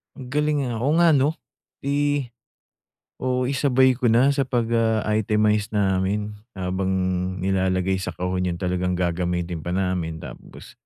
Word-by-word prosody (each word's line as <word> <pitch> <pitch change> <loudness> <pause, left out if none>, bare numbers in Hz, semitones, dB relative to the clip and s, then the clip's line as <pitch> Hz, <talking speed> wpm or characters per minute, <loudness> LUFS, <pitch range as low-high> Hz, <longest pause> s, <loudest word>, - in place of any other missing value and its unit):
Ang 130 -3 -10
galing, 150 0 +1
ah. 115 - -3
Oo 140 +6 +1
nga 170 -1 +5
'no? 145 +3 +2 0.5
Eh, 145 -2 0 0.9
o 125 0 0
isabay 130 0 +3
ko 125 -1 0
na 125 +5 +4
sa 135 -2 -1
pag, 120 -2 +1
ah, 110 -2 +2
itemize 105 -1 +2
namin 100 0 0 0.2
habang 95 0 -2 0.6
nilalagay 95 0 +1
sa 90 -3 -5
kahon 90 0 -1
'yon 85 - -2
talagang 90 0 -1
gagamitin 85 -1 -1
pa 90 +3 -3
namin 90 -4 -1
tapos, - - -11
105 Hz, 145 wpm, -23 LUFS, 90-130 Hz, 0.9 s, nga